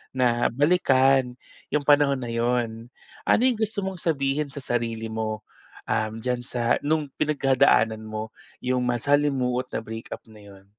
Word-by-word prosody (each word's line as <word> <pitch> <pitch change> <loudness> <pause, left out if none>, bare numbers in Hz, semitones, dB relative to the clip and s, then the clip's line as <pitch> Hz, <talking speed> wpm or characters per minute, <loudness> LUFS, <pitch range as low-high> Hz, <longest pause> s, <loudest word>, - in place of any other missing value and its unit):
na 120 -2 +2
balikan 135 -3 +3 0.4
yung 150 0 +1
panahon 145 -1 +4
na 120 - -4
yun, 115 -1 -1 0.4
ano - - +4
yung 245 -4 0
gusto 215 -2 -1
mong 190 -2 -4
sabihin 145 -2 0
sa 140 0 -7
sarili 115 -2 -2
mo 110 -1 -3 0.4
um 110 0 -1
diyan 125 +2 -2
sa 120 -1 -1
nung 155 +1 0
pinagdadaanan 135 -7 +2
mo 110 +1 -6 0.2
yung 125 0 -1
masalimuot 125 0 +1
na 110 - -4
breakup 110 +1 -7
na 110 -1 -16
yun? 100 -1 -15
125 Hz, 145 wpm, -25 LUFS, 115-145 Hz, 0.4 s, panahon